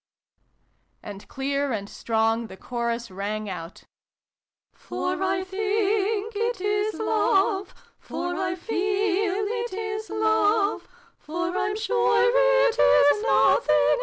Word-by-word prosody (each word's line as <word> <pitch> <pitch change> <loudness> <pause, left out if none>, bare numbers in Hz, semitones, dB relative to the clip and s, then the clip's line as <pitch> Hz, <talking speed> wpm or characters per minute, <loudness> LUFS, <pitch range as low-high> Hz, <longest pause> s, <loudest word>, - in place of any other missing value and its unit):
And 200 -1 -9
clear 280 +1 -2
and 200 -3 -3
strong 225 +1 -1
the 190 - -12
chorus 235 -1 -4
rang 210 +3 -4
out: 175 -2 -8 0.5
" - - -63
For 365 0 -4
I 380 0 0
think 415 +2 -1
it 460 0 -1
is 415 +2 -1
Love, 395 -2 +1 0.3
For 355 0 -4
I 365 0 -2
feel 400 0 0
it 465 +1 -3
is 430 +1 -4
Love, 430 -1 +1 0.3
For 345 +3 -4
I'm 415 +2 -1
sure 470 +2 +2
it - - +3
is 290 +9 +5
nothing 460 - +3
but - - +6
Love - - +3
390 Hz, 125 wpm, -25 LUFS, 280-430 Hz, 0.5 s, but